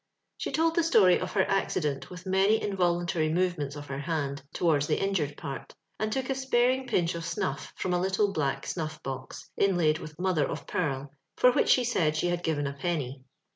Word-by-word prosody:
She -, -, -3 dB
told 325 Hz, +1 st, +2 dB
the 340 Hz, -, +3 dB
story 215 Hz, -, +5 dB
of 185 Hz, -, -4 dB
her 190 Hz, -2 st, +3 dB
accident 150 Hz, -7 st, -1 dB
with 180 Hz, 0 st, -10 dB
many 195 Hz, +3 st, +3 dB
involuntary 175 Hz, -4 st, 0 dB
movements 170 Hz, -5 st, 0 dB
of 145 Hz, 0 st, -7 dB
her 135 Hz, -1 st, -5 dB
hand 140 Hz, -2 st, -2 dB
to -, -, -5 dB
wards 150 Hz, -3 st, +3 dB
the -, -, +1 dB
injured 165 Hz, -8 st, -1 dB
part, 135 Hz, -1 st, -7 dB, 0.2 s
and 215 Hz, 0 st, -1 dB
took 260 Hz, +2 st, -1 dB
a -, -, +3 dB
sparing 260 Hz, 0 st, +1 dB
pinch 170 Hz, -2 st, +1 dB
of 170 Hz, -, -4 dB
snutr 165 Hz, -4 st, -3 dB
from 185 Hz, -, -2 dB
a 175 Hz, -, +1 dB
little 195 Hz, +2 st, +1 dB
black 145 Hz, -6 st, -1 dB
snuif 155 Hz, -3 st, -4 dB
box, 130 Hz, -1 st, -7 dB
inlaid 175 Hz, -6 st, +3 dB
with 155 Hz, 0 st, -9 dB
mother 175 Hz, -5 st, +1 dB
of -, -, -5 dB
pearl, 140 Hz, -5 st, -2 dB, 0.2 s
for 250 Hz, -, +6 dB
which -, -, +2 dB
she 255 Hz, -, +5 dB
said 165 Hz, -11 st, +1 dB
she 175 Hz, -, +1 dB
had 175 Hz, 0 st, -1 dB
given 150 Hz, -4 st, -1 dB
a 140 Hz, -, -2 dB
penny. 140 Hz, -3 st, -3 dB
175 Hz, 205 wpm, -28 LUFS, 145-195 Hz, 0.2 s, for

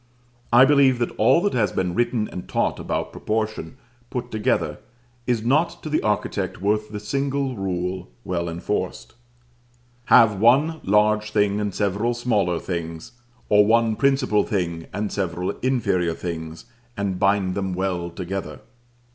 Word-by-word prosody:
I 120 Hz, +2 st, +8 dB
believe 135 Hz, -2 st, +4 dB
that 120 Hz, -1 st, -2 dB
all 130 Hz, +9 st, +5 dB
that 205 Hz, -, 0 dB
has 105 Hz, -6 st, +1 dB
been 90 Hz, -2 st, -1 dB
written 120 Hz, 0 st, 0 dB
and 90 Hz, -, -8 dB
taught -, -, 0 dB
about -, -, -3 dB
proportion, 105 Hz, -7 st, -3 dB, 0.3 s
put 125 Hz, -1 st, -5 dB
together, 110 Hz, -1 st, 0 dB, 0.5 s
is 120 Hz, -3 st, 0 dB
not 150 Hz, +7 st, +1 dB
to 155 Hz, -, -5 dB
the 155 Hz, -, +2 dB
architect 105 Hz, -1 st, -2 dB
worth 105 Hz, +2 st, 0 dB
the 105 Hz, -1 st, -5 dB
single 135 Hz, +4 st, -2 dB
rule, 90 Hz, -, -3 dB
well 85 Hz, -2 st, -2 dB
enforced, 85 Hz, +1 st, -4 dB, 0.9 s
"Have 105 Hz, -4 st, +5 dB
one 140 Hz, +9 st, +3 dB
large 105 Hz, +1 st, +2 dB
thing 105 Hz, -1 st, +1 dB
and 105 Hz, -1 st, -1 dB
several 105 Hz, +5 st, -1 dB
smaller 105 Hz, -8 st, 0 dB
things, 85 Hz, -1 st, -5 dB, 0.4 s
or 105 Hz, 0 st, +5 dB
one 115 Hz, +1 st, +3 dB
principal 135 Hz, -5 st, +2 dB
thing 85 Hz, -5 st, -3 dB
and 105 Hz, 0 st, -3 dB
several 90 Hz, -1 st, -2 dB
inferior 95 Hz, -10 st, 0 dB
things, 80 Hz, -1 st, -6 dB, 0.3 s
and 100 Hz, -2 st, -2 dB
bind 100 Hz, -1 st, +2 dB
them 95 Hz, -1 st, -2 dB
well 90 Hz, -2 st, -2 dB
together." 95 Hz, +2 st, -6 dB
105 Hz, 145 wpm, -23 LUFS, 90-120 Hz, 0.9 s, I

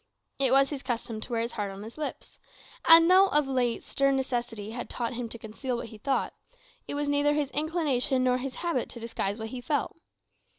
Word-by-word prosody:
It 265 Hz, -2 st, +3 dB
was 275 Hz, +1 st, +5 dB
his 280 Hz, -2 st, -4 dB
custom 230 Hz, -3 st, -3 dB
to 245 Hz, -, -4 dB
wear 230 Hz, -1 st, +1 dB
his 235 Hz, +1 st, -2 dB
heart 205 Hz, -2 st, -3 dB
on 195 Hz, +1 st, -8 dB
his 225 Hz, +2 st, -10 dB
lips; 305 Hz, -1 st, -6 dB, 0.5 s
and 330 Hz, 0 st, +9 dB
though 375 Hz, +2 st, +7 dB
of 295 Hz, -6 st, +2 dB
late 250 Hz, -3 st, 0 dB
stern 275 Hz, 0 st, +1 dB
necessity 240 Hz, -5 st, -3 dB
had 245 Hz, +1 st, -5 dB
taught 235 Hz, -1 st, -2 dB
him 240 Hz, -1 st, -4 dB
to 235 Hz, -, -5 dB
conceal 235 Hz, +3 st, -4 dB
what 235 Hz, -, -6 dB
he 220 Hz, -, -12 dB
thought, 270 Hz, +3 st, 0 dB, 0.5 s
it -, -, -4 dB
was 290 Hz, 0 st, -1 dB
neither 290 Hz, +1 st, +2 dB
his 290 Hz, -2 st, -1 dB
inclination 295 Hz, -5 st, +1 dB
nor 250 Hz, 0 st, +2 dB
his 265 Hz, 0 st, -5 dB
habit 325 Hz, -8 st, 0 dB
to 235 Hz, -, -9 dB
disguise 225 Hz, -3 st, -3 dB
what 220 Hz, -1 st, -5 dB
he 250 Hz, +1 st, -6 dB
felt. 290 Hz, +2 st, -1 dB
255 Hz, 215 wpm, -28 LUFS, 230-285 Hz, 0.5 s, and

